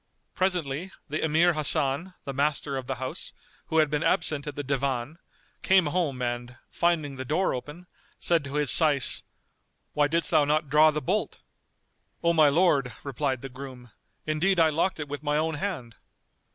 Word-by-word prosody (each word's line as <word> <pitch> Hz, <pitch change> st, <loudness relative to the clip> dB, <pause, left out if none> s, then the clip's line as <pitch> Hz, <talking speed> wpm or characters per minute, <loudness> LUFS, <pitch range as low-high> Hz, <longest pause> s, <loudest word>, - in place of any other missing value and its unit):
[FN#232] -, -, -47 dB
Presently, 180 Hz, -2 st, -1 dB, 0.2 s
the 155 Hz, +2 st, -2 dB
Emir 160 Hz, +3 st, +3 dB
Hasan, 155 Hz, +3 st, +1 dB
the 140 Hz, -, -5 dB
master 140 Hz, 0 st, 0 dB
of 130 Hz, -2 st, -5 dB
the 135 Hz, -, -2 dB
house, 130 Hz, +1 st, -6 dB, 0.3 s
who 160 Hz, -, -1 dB
had 155 Hz, -2 st, +3 dB
been 150 Hz, 0 st, 0 dB
absent 155 Hz, -3 st, 0 dB
at 145 Hz, -, -5 dB
the 145 Hz, -, -4 dB
Divan, 135 Hz, +2 st, -2 dB, 0.4 s
came 190 Hz, -2 st, +4 dB
home 150 Hz, -5 st, -1 dB
and, 120 Hz, +1 st, -4 dB
finding 160 Hz, -5 st, 0 dB
the 130 Hz, -, -4 dB
door 160 Hz, +9 st, 0 dB
open, 150 Hz, +7 st, -7 dB, 0.3 s
said 170 Hz, -3 st, +1 dB
to 140 Hz, +1 st, -6 dB
his 150 Hz, -1 st, +2 dB
Syce, 145 Hz, -5 st, +4 dB, 0.7 s
"Why 145 Hz, -1 st, +2 dB
didst 165 Hz, +1 st, 0 dB
thou 150 Hz, -, +5 dB
not 150 Hz, +1 st, 0 dB
draw 150 Hz, +2 st, +6 dB
the 150 Hz, 0 st, -3 dB
bolt?" 200 Hz, +5 st, -2 dB, 0.8 s
"O 170 Hz, 0 st, +3 dB
my 155 Hz, -3 st, +5 dB
lord," 140 Hz, -6 st, +2 dB
replied 135 Hz, -2 st, -2 dB
the 135 Hz, -, -7 dB
groom, 130 Hz, -2 st, -10 dB, 0.3 s
"indeed 170 Hz, +5 st, +1 dB
I 160 Hz, -1 st, +4 dB
locked 165 Hz, +3 st, 0 dB
it 150 Hz, -, -4 dB
with 145 Hz, 0 st, -6 dB
my 150 Hz, 0 st, 0 dB
own 160 Hz, +1 st, 0 dB
hand." 150 Hz, -, -5 dB
150 Hz, 180 wpm, -26 LUFS, 135-165 Hz, 0.8 s, draw